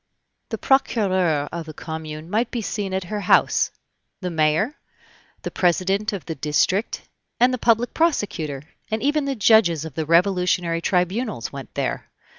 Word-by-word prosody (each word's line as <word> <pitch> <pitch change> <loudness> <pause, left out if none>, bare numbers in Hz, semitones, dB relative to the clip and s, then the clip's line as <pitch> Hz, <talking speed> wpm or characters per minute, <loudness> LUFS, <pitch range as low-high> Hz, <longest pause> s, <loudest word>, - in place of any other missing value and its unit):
The 225 - -3
procureur 190 - +2
of 170 -2 -5
the 155 - -9
commune 160 -1 -7
might 225 +6 0
be 235 -3 -3
seen 200 -2 -3
at 190 0 -1
her 210 +4 -4
house, 185 - +3 0.5
the 180 -2 -4
mayor, 160 - +1 0.6
the - - -4
president 190 +4 +1
of 200 -5 -6
the 165 - -4
"district," 160 - 0 0.4
and 250 +1 +4
the 255 - -2
public 230 +1 +2
prosecutor, 175 - -1 0.3
and 220 0 -2
even 290 +1 +1
the 275 -1 -1
judges 195 - +4
of 160 - -8
the 155 +2 -3
Revolutionary 175 -1 +2
tribunals 185 - -1
went 135 -2 -9
there. - - -3
185 Hz, 155 wpm, -22 LUFS, 160-220 Hz, 0.6 s, and